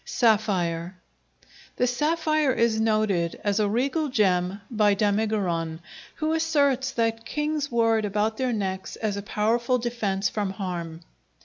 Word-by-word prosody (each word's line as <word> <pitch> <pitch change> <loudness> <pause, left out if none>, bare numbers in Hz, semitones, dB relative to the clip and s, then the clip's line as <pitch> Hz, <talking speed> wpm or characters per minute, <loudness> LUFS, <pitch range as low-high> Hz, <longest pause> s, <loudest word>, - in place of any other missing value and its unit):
Sapphire 185 -6 +1 0.8
The 250 - +1
sapphire 310 +2 +1
is 230 -2 +2
noted 215 -6 +1
as 205 0 +1
a 210 -1 +2
regal 280 +7 0
gem 190 -4 +1
by 210 -3 +3
Damigeron, 200 -6 0 0.4
who 310 0 -1
asserts 285 -5 +1
that 225 -1 0
kings 300 +2 -2
wore 225 -1 +3
it 215 - -2
about 210 +2 0
their 255 -1 0
necks 190 -4 -3
as 215 -2 -2
a 200 - -4
powerful 230 +4 +1
defence 215 -5 -1
from 200 -1 -2
harm. 175 -4 -5
220 Hz, 135 wpm, -25 LUFS, 195-250 Hz, 0.8 s, by